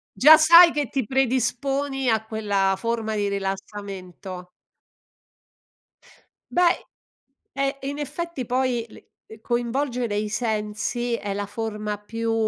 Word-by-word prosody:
Già 310 +4 +9
sai 335 +2 +8
che 290 -4 -2
ti 265 -4 -1
predisponi 270 +2 0
a 220 -1 +1
quella 205 -3 0
forma 225 +1 -2
di 205 -1 0
rilassamento. 195 -2 -6 2.0
Beh 355 -1 +4 0.8
eh, 275 0 -1
in 280 +2 -4
effetti 300 -1 -4
poi 250 -2 0
le - - -16 0.2
ehm, 220 - -13
coinvolgere 240 -1 -1
i 210 +1 -1
sensi 215 +2 -2
è 205 -3 -4
la 205 - -2
forma 210 0 -4
più 225 +2 -3
230 Hz, 115 wpm, -24 LUFS, 210-270 Hz, 2.0 s, Già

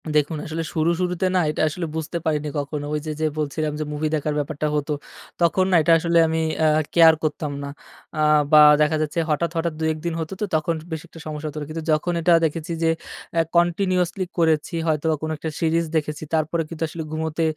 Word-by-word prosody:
দেখুন 150 +1 +2
আসলে 160 +1 -3
শুরু, 160 +1 +1
শুরুতে 180 0 -1
না - - +4
এটা 150 - -2
আসলে 170 +3 -4
বুঝতে 160 +2 -3
পারিনি 150 -1 0
কখনো 145 +1 -4
ওই 150 - 0
যে, 155 - -3
যে - - +2
বলছিলাম 150 +1 -2
যে, - - 0
মুভি 150 +1 -1
দেখার 150 0 -1
ব্যাপারটা 150 +1 -2
হতো, 150 +1 -1 0.5
তখন 175 +2 +3
না - - +4
এটা 155 - +2
আসলে 170 +1 +1
আমি, 160 0 0 0.2
আ - - +5 0.3
কেয়ার 165 -1 +7
করতাম 150 -1 -2
না, 140 - -5 0.5
আ - - -2 0.3
বা 155 -1 +9 0.2
দেখা 150 +1 +3
যাচ্ছে, 155 +2 -1
হঠাৎ, 160 +3 0
হঠাৎ 165 0 0
২, - - -3
১ - - -8
দিন 170 - -1
হত, 160 -1 -4
তো - - +2
তখন 155 +2 +1 0.2
বেশ 160 -1 -3
একটা 165 - -13
সমস্যা 155 0 -5
হত, 145 - -12
কিন্তু 160 +1 -5
যখন 155 +3 +1
এটা 170 +1 +4
দেখেছি 160 +1 -3
যে, 165 - +3 0.5
আ - - +6 0.2
কন্টিনিউয়াসলি 180 +1 +1
করেছি, 160 0 +1
হয়তোবা 155 0 +1
কোনো 155 0 -3
একটা 160 - -4
সিরিজ 165 0 +1
দেখেছি, 150 -1 -1
তারপরে 160 +1 +1
কিন্তু 165 -1 -5
আসলে 160 +1 -6
ঘুমোতে 160 +1 -2
160 Hz, 210 wpm, -23 LUFS, 150-170 Hz, 0.5 s, বা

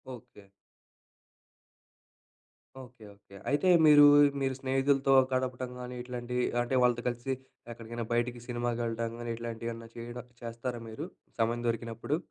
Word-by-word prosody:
Okay. 105 -3 -16 2.4
Okay. 125 -2 -16
Okay. 100 -1 -18
అయితే 145 +6 +1 0.2
మీరు, 145 -1 +9 0.4
మీరు 135 -1 0
స్నేహితులతో 135 +1 +2 0.2
గడపటం 130 0 -1
కాని, 125 0 -6
ఇట్లాంటివి 125 0 -3 0.2
అంటే 120 +2 -1
వాళ్ళతో 120 -1 +2
కలిసి 120 +2 -4 0.4
ఎక్కడికైనా 115 0 -6
బయటికి, 120 +1 0
సినిమాకి 120 -1 -2
వెళ్ళడం 115 0 -2
కాని 120 0 -4
ఇట్లాంటివి 115 0 -5
ఏమన్నా 115 0 -10
చేయడం 120 +1 -8 0.2
చేస్తారా 115 +1 -5
మీరు? 125 +8 -6 0.3
సమయం 115 +1 +1
దొరికినప్పుడు. 115 +5 -2
120 Hz, 120 wpm, -30 LUFS, 115-125 Hz, 2.4 s, మీరు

